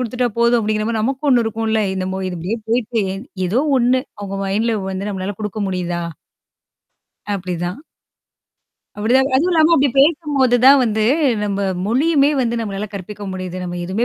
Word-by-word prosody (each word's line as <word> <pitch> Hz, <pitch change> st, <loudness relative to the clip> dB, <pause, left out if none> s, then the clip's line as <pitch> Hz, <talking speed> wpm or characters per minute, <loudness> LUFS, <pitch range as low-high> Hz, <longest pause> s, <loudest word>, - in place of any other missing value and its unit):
குடுத்துட்டா 250 Hz, 0 st, -1 dB
போதும் 235 Hz, +1 st, +4 dB
அப்பிடிங்கிற 215 Hz, -1 st, -1 dB
மாரி 225 Hz, -2 st, -1 dB
நமக்கும் 270 Hz, +4 st, -1 dB
ஒண்ணு 245 Hz, -3 st, +4 dB
இருக்கும்ல. 220 Hz, 0 st, 0 dB
என்னமோ 190 Hz, 0 st, -3 dB
இதுபடியே 180 Hz, +5 st, -3 dB
போயிட்டு 230 Hz, -1 st, 0 dB, 0.4 s
ஏதோ 225 Hz, +9 st, +1 dB, 0.2 s
ஒண்ணு 250 Hz, +1 st, +3 dB, 0.2 s
அவுங்க 195 Hz, -1 st, -5 dB
மைண்ட்ல 220 Hz, +4 st, 0 dB, 0.2 s
வந்து 190 Hz, +2 st, -4 dB
நம்மளால 190 Hz, 0 st, -4 dB
குடுக்க 210 Hz, 0 st, -4 dB
முடியுதா? 175 Hz, -2 st, -2 dB, 1.3 s
அப்பிடிதான். 180 Hz, -, -4 dB, 1.1 s
அப்பிடிதான். 255 Hz, +6 st, +2 dB
அதுவும் 350 Hz, +6 st, +2 dB
இல்லாம 320 Hz, 0 st, +4 dB
அப்பிடி 280 Hz, -2 st, +3 dB
பேசும்போது 285 Hz, -4 st, +3 dB
தான் 275 Hz, +1 st, +8 dB
வந்து 220 Hz, -2 st, 0 dB, 0.4 s
நம்ம 200 Hz, -1 st, -2 dB, 0.3 s
மொழியுமே 280 Hz, +4 st, +3 dB
வந்து 235 Hz, -1 st, 0 dB
நம்மளால 205 Hz, -1 st, -4 dB
கற்பிக்க 205 Hz, +1 st, -8 dB
முடியுது. 185 Hz, -1 st, -5 dB
நம்ம 175 Hz, -1 st, -5 dB
எதுவுமே 190 Hz, +7 st, -1 dB
220 Hz, 145 wpm, -19 LUFS, 195-250 Hz, 1.3 s, தான்